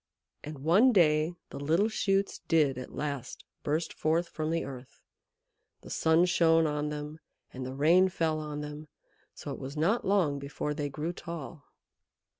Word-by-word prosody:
And 145 -2 -8
one 200 - +5
day 160 -4 +3 0.2
the - - -6
little 165 +9 +2
shoots 195 -2 0
did 145 -6 +3
at 130 - -8
last 140 -4 -5 0.2
burst 155 +3 -1
forth 165 +2 0
from 155 0 -3
the 165 +1 -1
earth. 130 -2 -10 0.8
The - - -11
sun 160 +2 +3
shone 165 -2 +4
on 150 -1 -1
them, 150 +1 -6 0.3
and 130 0 -5
the 130 - -6
rain 170 +7 +5
fell 160 -3 0
on 150 -1 -5
them, 150 +1 -7 0.5
so - - -7
it - - -6
was 135 +3 -7
not 190 +10 +2
long 180 -8 +2
before 145 +1 -4
they 145 -1 -3
grew 155 +5 -4
tall. 165 -4 -8
155 Hz, 165 wpm, -30 LUFS, 145-170 Hz, 0.8 s, one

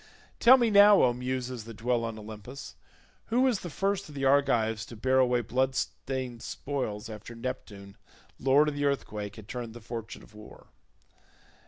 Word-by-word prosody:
Tell 255 +3 +8
me 235 -3 +2
now, 205 0 +7
O 125 - +4
Muses 125 -1 -4
that 115 -1 -9
dwell 120 0 0
on 115 -1 -4
Olympus, 110 - -9 0.5
who 240 +3 +2
was 255 -6 +2
the 175 - -7
first 195 +2 -1
of 150 - -11
the 135 -1 -2
Argives 120 -6 +2
to 120 - -10
bear 130 +4 +2
away 125 -1 +3
blood 130 +4 0
stained 130 -4 -4
spoils 125 -6 -4
after 110 +2 -9
Neptune 105 -5 -7 0.4
lord 135 +3 +4
of 150 - -1
the 145 0 -2
earthquake 105 -7 -2
had 110 -2 -12
turned 120 -1 -6
the - - -8
fortune 115 0 -7
of - - -18
war. 105 0 -14
125 Hz, 175 wpm, -28 LUFS, 110-140 Hz, 0.5 s, Tell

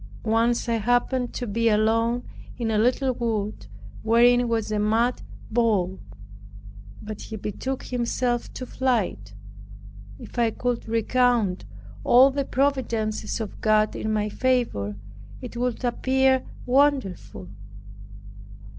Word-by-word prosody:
Once 230 +2 +1
I 230 -1 +1
happened 245 +2 +1
to 245 - -3
be 230 +1 +1
alone 230 +3 +2 0.3
in 230 -2 -1
a 215 - +2
little 255 +3 +2
wood 215 - -3 0.3
wherein 240 +2 +4
was 225 -2 -1
a 210 - 0
mad 225 +4 +1 0.3
bull; 210 -5 +1 1.0
but 215 0 -7
he 220 - -7
betook 235 +6 -4
himself 240 0 -1
to 255 - -5
flight. 210 - -1 0.8
If 240 - -8
I 230 -1 +3
could 245 +1 -3
recount 230 -3 +1 0.4
all 260 +3 +6
the 280 0 -2
providences 235 -7 -1
of 220 -3 -6
God 215 0 +2
in 220 - -2
my 210 -1 0
favor, 225 - 0 0.4
it 250 -2 -9
would 250 +1 -2
appear 260 +2 +2 0.2
wonderful. 260 - 0
235 Hz, 120 wpm, -24 LUFS, 215-250 Hz, 1.0 s, all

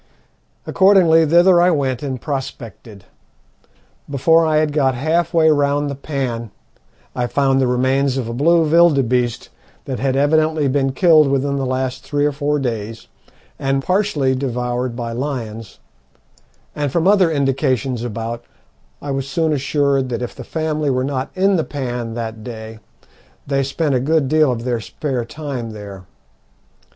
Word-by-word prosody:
Accordingly 180 -5 +4
thither 175 +2 +5
I 175 - +4
went 135 -6 -1
and 135 -3 -4
prospected. 115 -7 -7 1.0
Before 160 +4 +3
I 155 -1 +2
had 155 -1 +1
got 135 -4 +1
half 160 +5 0
way 160 -2 +4
round 145 0 +1
the - - -3
pan 130 -5 -4 0.7
I 125 -1 -1
found 135 +1 +1
the 130 - +2
remains 130 +2 +1
of 125 -4 -3
a 115 - -4
blue 165 +6 +3
vilderbeeste 135 -7 +2 0.4
that 130 -4 -4
had 135 +1 0
evidently 155 +1 +2
been 135 0 0
killed 160 -3 +5
within 140 +1 0
the 135 -1 -2
last 130 0 -3
three 145 0 -1
or 150 - +2
four 145 +1 -1
days 115 -4 -4 0.5
and 135 0 -1
partially 180 -8 +1
devoured 125 -1 -2
by 120 -1 -4
lions; 115 -4 -5 1.0
and 145 -2 -2
from 170 +4 +1
other 195 -4 +4
indications 135 -4 0
about 115 0 -5 0.6
I 145 - -4
was 135 0 -3
soon 160 +2 0
assured 140 -1 0
that 120 0 -3
if 120 - -5
the 130 - -9
family 155 0 -2
were 130 -1 0
not 135 -1 -3
in 195 +1 +2
the 160 - 0
pan 120 -6 -5
that 110 -2 -5
day 110 -2 -8 0.7
they 140 -1 0
spent 140 +2 -1
a 130 - +2
good 150 +2 +1
deal 155 -1 +3
of 115 -1 -4
their 120 -2 -1
spare 125 +2 -4
time 130 -4 -6
there. 100 -3 -10
135 Hz, 155 wpm, -19 LUFS, 125-155 Hz, 1.0 s, thither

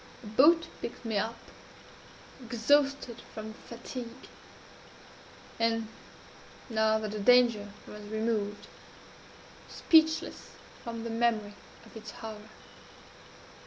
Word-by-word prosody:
A - - -10
boat 300 +10 +5 0.2
picked 235 - -6
me 220 -3 +1
up 225 +3 -2 1.1
exhausted 250 +2 +2
from 220 0 -6
fatigue 235 +1 -9 1.3
and 225 -1 +1 0.8
(now 220 0 +3
that 215 -1 -3
the 215 - -4
danger 230 -2 +5
was 210 - -10
removed) 215 -1 -2 1.0
speechless 320 -1 +3 0.3
from 230 -2 -5
the 230 - -4
memory 225 -3 +1 0.3
of - - -16
its 220 -1 -8
horror. 215 -1 -8
225 Hz, 95 wpm, -30 LUFS, 215-240 Hz, 1.3 s, boat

